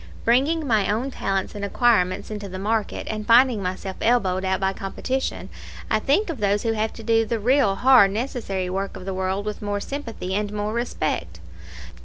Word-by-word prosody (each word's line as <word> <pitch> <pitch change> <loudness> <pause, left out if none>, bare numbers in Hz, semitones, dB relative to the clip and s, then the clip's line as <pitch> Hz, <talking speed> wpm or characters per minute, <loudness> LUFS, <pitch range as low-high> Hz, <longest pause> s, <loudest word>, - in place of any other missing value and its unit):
Bringing 285 +7 +2
my 220 -6 +2
own 245 +6 -1
talents 195 -5 -2
and 205 -1 -6
acquirements 200 -3 +1
into 205 -2 -5
the 185 - -6
market, 215 +2 -1
and 215 -1 -4
finding 240 -2 +5
myself 185 +1 -4
elbowed 195 -6 +2
out 190 0 0
by 195 0 0
competition, 255 +8 -3 0.4
I 215 - +3
think 330 - +1
of 290 - -7
those 205 0 +1
who 225 - +1
have 220 0 -1
to 225 - -10
do 225 0 +3
the 225 +1 -2
real 245 -2 +3
hard 250 -3 +6
necessary 210 -4 -3
work 195 +2 -3
of 185 - -10
the 195 - -3
world 190 +2 -2
with 210 0 -4
more 205 -1 -2
sympathy 230 -7 -5
and 205 +1 -1
more 210 +1 -3
respect. 235 +1 -2
210 Hz, 190 wpm, -23 LUFS, 195-240 Hz, 0.4 s, hard